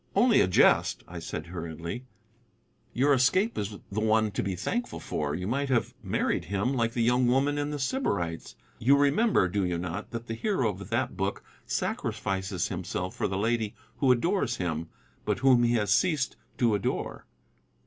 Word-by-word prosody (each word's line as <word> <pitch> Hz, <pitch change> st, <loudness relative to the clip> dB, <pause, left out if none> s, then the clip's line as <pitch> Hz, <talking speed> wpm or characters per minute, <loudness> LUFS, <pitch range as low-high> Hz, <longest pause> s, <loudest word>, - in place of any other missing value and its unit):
"Only 240 Hz, -2 st, +5 dB
a -, -, +3 dB
jest," 95 Hz, -, +4 dB
I 85 Hz, 0 st, -7 dB
said 80 Hz, -1 st, -5 dB
hurriedly; 85 Hz, +6 st, -6 dB, 0.9 s
"your 140 Hz, +4 st, +3 dB
escape 185 Hz, -, +3 dB
is 105 Hz, 0 st, -3 dB
the 105 Hz, -, -1 dB
one 110 Hz, 0 st, +2 dB
to -, -, -2 dB
be 95 Hz, -1 st, -2 dB
thankful 240 Hz, -, -3 dB
for. 75 Hz, -1 st, -2 dB
You 90 Hz, -, -4 dB
might 135 Hz, +6 st, -1 dB
have 120 Hz, -1 st, +1 dB
married 95 Hz, -4 st, -1 dB
him, 100 Hz, -, -1 dB
like 115 Hz, -3 st, 0 dB
the 120 Hz, -2 st, +1 dB
young 125 Hz, +1 st, +3 dB
woman 140 Hz, +4 st, +2 dB
in 145 Hz, 0 st, -1 dB
The 150 Hz, -, -3 dB
Sybarites. 100 Hz, -, -2 dB, 0.2 s
You 140 Hz, +5 st, +5 dB
remember, 145 Hz, -, +3 dB
do 100 Hz, +2 st, -1 dB
you 90 Hz, -1 st, 0 dB
not, 90 Hz, +3 st, -4 dB
that 115 Hz, 0 st, -6 dB
the 115 Hz, -, -4 dB
hero 125 Hz, -, 0 dB
of 100 Hz, 0 st, -9 dB
that 120 Hz, +1 st, -1 dB
book 95 Hz, +2 st, -2 dB, 0.2 s
sacrifices 95 Hz, -2 st, -2 dB
himself 90 Hz, 0 st, -4 dB
for -, -, 0 dB
the 95 Hz, -, -2 dB
lady 110 Hz, 0 st, 0 dB, 0.2 s
who 135 Hz, -3 st, +4 dB
adores 135 Hz, -, +1 dB
him, 85 Hz, -2 st, -3 dB, 0.3 s
but -, -, 0 dB
whom 130 Hz, -2 st, +5 dB
he 120 Hz, 0 st, +3 dB
has 105 Hz, -4 st, +1 dB
ceased 150 Hz, -, +2 dB, 0.2 s
to 120 Hz, -3 st, +3 dB
adore?" 100 Hz, -, -2 dB
110 Hz, 180 wpm, -28 LUFS, 95-130 Hz, 0.9 s, Only